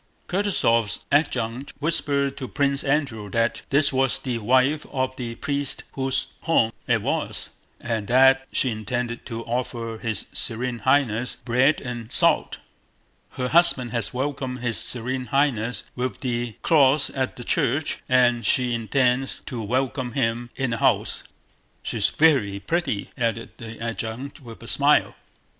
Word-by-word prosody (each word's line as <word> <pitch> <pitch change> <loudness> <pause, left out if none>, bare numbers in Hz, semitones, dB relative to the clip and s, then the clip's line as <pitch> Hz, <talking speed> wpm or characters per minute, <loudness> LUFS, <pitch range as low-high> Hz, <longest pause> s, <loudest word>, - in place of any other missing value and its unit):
Kutúzov's 145 - +1
adjutant 135 -3 0
whispered 140 -2 +1
to 130 - -5
Prince 140 0 0
Andrew 135 -8 -1
that 115 +3 0
this 140 +1 +4
was 135 -1 +2
the 125 -3 -3
wife 130 +7 +2
of 130 -1 -1
the 120 -3 -5
priest 140 +1 -1
whose 135 -1 -1
home 115 -9 +2 0.2
it - - +2
was, - - -2 0.3
and 110 -4 -3
that 135 +2 +5
she 130 - 0
intended 120 +2 -4
to 115 -2 -5
offer 115 -2 -3
his 110 -4 -2
Serene 120 +1 -1
Highness 125 -1 +1
bread 130 +5 +3
and 120 -3 -6
salt. - - +3 0.8
"Her 125 0 -2
husband 155 -7 +4
has 115 -4 0
welcomed 130 -1 -3
his 115 -3 +1
Serene 125 +1 -1
Highness 125 -6 0
with 125 0 -3
the 120 -3 -2
cross 145 -2 +4
at 130 -1 -2
the 120 - -8
church, 140 +5 0
and 120 -2 +4
she 125 +4 +2
intends 125 +3 0
to 120 -4 -5
welcome 125 +2 -1
him 120 -2 -1
in 130 -2 -1
the 115 - -1
house.... - - +1 0.6
She's - - 0
very 130 -11 +3
pretty," 160 - -2
added 115 -1 -1
the 115 -1 -9
adjutant 115 +5 -5
with 115 -3 -11
a - - -9
smile. - - +3
125 Hz, 145 wpm, -24 LUFS, 115-135 Hz, 0.8 s, that